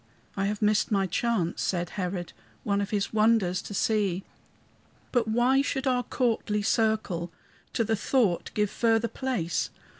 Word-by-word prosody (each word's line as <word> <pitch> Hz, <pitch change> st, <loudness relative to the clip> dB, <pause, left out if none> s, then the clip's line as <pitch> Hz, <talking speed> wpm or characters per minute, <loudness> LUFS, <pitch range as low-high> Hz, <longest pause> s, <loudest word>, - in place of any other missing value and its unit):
"I 195 Hz, -, 0 dB
have 210 Hz, +1 st, -2 dB
missed 210 Hz, +1 st, +2 dB
my 195 Hz, -2 st, +2 dB
chance," 190 Hz, -2 st, -1 dB
said 175 Hz, -2 st, -1 dB
Herod, 180 Hz, -2 st, -4 dB, 0.3 s
"One 200 Hz, -1 st, +1 dB
of 200 Hz, -, -3 dB
his 205 Hz, 0 st, -1 dB
wonders 215 Hz, -4 st, +3 dB
to 205 Hz, -, -7 dB
see. 195 Hz, -4 st, +1 dB, 0.9 s
"But 240 Hz, -3 st, +1 dB
why 245 Hz, +4 st, +3 dB
should 275 Hz, -1 st, -2 dB
our 250 Hz, -2 st, +2 dB
courtly 225 Hz, -4 st, 0 dB
circle 215 Hz, -6 st, 0 dB, 0.4 s
To 230 Hz, -, +1 dB
the 225 Hz, 0 st, +1 dB
thought 210 Hz, -4 st, +1 dB
give 210 Hz, -1 st, +1 dB
further 230 Hz, 0 st, +2 dB
place? 230 Hz, -, -2 dB
210 Hz, 150 wpm, -27 LUFS, 195-230 Hz, 0.9 s, wonders